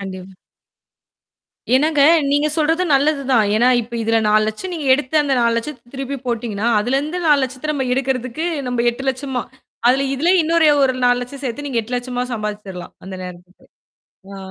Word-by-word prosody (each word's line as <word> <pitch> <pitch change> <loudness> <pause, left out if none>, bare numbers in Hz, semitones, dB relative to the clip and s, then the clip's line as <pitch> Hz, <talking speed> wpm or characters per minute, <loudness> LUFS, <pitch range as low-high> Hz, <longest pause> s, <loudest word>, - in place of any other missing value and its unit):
கண்டிப் 190 -1 -8 1.4
என்னாங்க 300 +1 +2 0.3
நீங்க 290 +1 +2
சொல்றது 325 +3 +1
நல்லது 285 +1 +2
தான். 225 -4 +4
ஏன்னா, 235 +3 +3
இப்ப 235 +1 -9
இதுல 225 0 +2
4 215 0 +4
லட்சம் 360 +13 -5
நீங்க 305 -4 -5
எடுத்து 290 +2 -2
அந்த 280 -2 0
4 235 -1 +2
லட்சத்த 240 0 -6
திருப்பி 270 +1 -4
போட்டீங்கன்னா, 230 -2 -2
அதுலருந்து 275 +9 -1
4 295 -2 +5
லட்சத்த 260 +4 -4
நம்ம 270 -3 -2
எடுக்கறதுக்கு 260 +3 -2 0.2
நம்ம 240 -1 -1
8 240 +3 -8
லட்சமா, 260 -1 -4 0.5
அதுல 270 +2 +2
இதுலே 335 +7 +2
இன்னொரு 325 0 +3 0.2
ஒரு 260 - +1
4 245 0 +3
லட்சம் 275 +3 -9
சேத்து 270 +3 -4
நீங்க 240 -4 0
8 245 +3 -4
லட்சமா 245 0 -3
சம்பாதிச்சுரலாம். 205 -4 -6
அந்த 190 - -7
நேரத்துக்கு. 180 0 -12 0.7
ஆ. - - -8
255 Hz, 165 wpm, -19 LUFS, 230-285 Hz, 1.4 s, 4